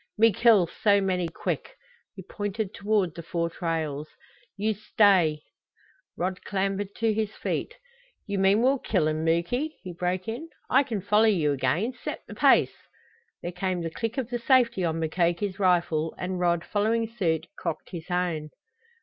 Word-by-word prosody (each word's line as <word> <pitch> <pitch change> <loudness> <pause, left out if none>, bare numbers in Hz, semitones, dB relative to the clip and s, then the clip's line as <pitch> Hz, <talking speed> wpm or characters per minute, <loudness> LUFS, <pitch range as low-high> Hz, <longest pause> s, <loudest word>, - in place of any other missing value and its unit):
"Me 225 0 +5
kill 220 -3 +5
so 200 +4 +2
many 185 -3 0
quick!" - - -4 0.4
He 190 - -9
pointed 205 +1 -4
toward 205 -4 0
the 170 - -7
four 170 0 -2
trails. 155 -4 -3 0.5
"You 215 +2 +1
stay 190 -7 +3 0.4
" - - -35
Rod 185 +1 -2
clambered 195 0 -2
to 225 -1 +1
his 215 -1 -2
feet. - - -3 0.5
"You 200 -2 -2
mean 195 +4 +4
we'll 270 +1 +3
kill 185 -10 +1
'em, 155 0 -1
Muky," 175 - 0
he 180 -2 -6
broke 180 +1 -2
in. 250 +9 -5 0.2
"I - - +6
can 235 -8 -3
follow 210 +3 +3
you 170 -9 +3
again. 150 - 0
Set - - -5
the - - -10
pace!" - - +4 0.7
There 175 - -3
came 180 -1 -2
the 165 - -3
click 225 +7 -4
of 250 -2 -3
the 240 - -1
safety 235 -6 +3
on 165 -1 0
Mukoki's 175 +4 0
rifle, 170 -4 +1
and 185 0 -3
Rod, 170 -1 +1
following 225 +2 +1
suit, 170 -8 -1
cocked 165 -3 -5
his 170 -1 -7
own. 175 -4 -1
190 Hz, 165 wpm, -26 LUFS, 170-215 Hz, 0.7 s, I